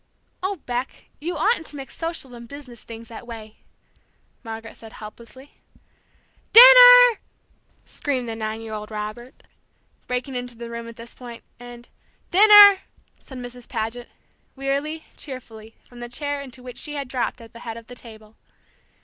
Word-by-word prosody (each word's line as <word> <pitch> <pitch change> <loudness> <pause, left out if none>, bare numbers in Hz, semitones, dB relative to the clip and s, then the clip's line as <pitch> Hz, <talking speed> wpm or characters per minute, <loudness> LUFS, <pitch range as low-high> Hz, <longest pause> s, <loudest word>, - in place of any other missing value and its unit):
"Oh, 380 +2 -2
Beck, 245 +1 -5
you 340 +4 -4
oughtn't 330 0 0
to - - -10
mix 270 -2 -10
social 330 -6 -5
and 235 -1 -11
business 255 -4 -12
things 230 0 -11
that 235 +1 -11
way!" 220 -2 -10 0.9
Margaret 225 -1 -8
said 225 -1 -14
helplessly. 235 +5 -13 1.0
"Dinner!" - - +10 0.7
screamed 260 -4 -4
the 225 - -5
nine 220 0 -5
year 225 -1 -8
old 210 0 -7
Robert, 215 +3 -8 0.6
breaking 250 +2 -4
into 245 -1 -6
the 235 0 -8
room 235 0 -7
at 230 - -11
this 230 0 -12
point, 240 -2 -11 0.2
and 245 0 -12 0.4
"Dinner!" 410 0 +8 0.4
said 265 - -12
Mrs. 245 0 -10
Paget, 230 +1 -5 0.5
wearily, 280 +4 -3
cheerfully, 225 -5 -10
from 245 - -16
the 240 0 -8
chair 285 +3 -4
into 255 -2 -11
which 250 -1 -9
she 295 -1 -6
had 280 -2 -5
dropped 255 0 -3
at 230 -1 -15
the 235 - -12
head 230 -1 -8
of 230 - -12
the 245 - -12
table. 220 -3 -14
245 Hz, 160 wpm, -22 LUFS, 230-285 Hz, 1.0 s, Dinner